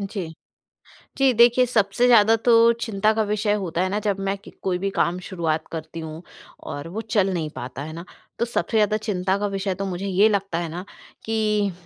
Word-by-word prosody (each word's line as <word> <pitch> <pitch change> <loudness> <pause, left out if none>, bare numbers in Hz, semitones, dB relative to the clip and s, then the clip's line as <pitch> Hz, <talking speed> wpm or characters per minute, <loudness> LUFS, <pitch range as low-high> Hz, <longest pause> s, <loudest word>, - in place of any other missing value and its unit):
जी। 195 -4 -5 0.9
जी 270 -1 +4
देखिए, 240 +2 +5
सबसे 230 0 +1
ज़्यादा 225 -2 +6
तो 240 - +6 0.3
चिंता 215 0 +1
का 220 0 +1
विषय 210 0 +1
होता 170 0 -2
है 185 - +1
ना 205 +2 -1
जब 200 -1 0
मैं 200 - -1
कि 200 - -15
कोई 185 -2 0
भी 195 +2 -2
काम 175 +2 0
शुरुआत 165 -4 -2
करती 160 0 -6
हूँ 160 0 -7 0.5
और 145 +3 -5
वो 220 - -2 0.2
चल 195 -1 +3
नहीं 160 -4 -2
पाता 125 +2 -6
है 155 +2 -6
ना, 170 +2 -8 0.3
तो 235 - +2
सबसे 235 -1 -1
ज़्यादा 215 0 +3
चिंता 195 -3 -1
का 205 - -1
विषय 195 -1 -2
तो 195 +2 -4
मुझे 190 +1 -4
ये 200 +3 +4
लगता 195 -4 -1
है 170 -1 -3
ना, 175 +4 -6 0.4
कि 215 -2 0
195 Hz, 210 wpm, -23 LUFS, 175-215 Hz, 0.9 s, ज़्यादा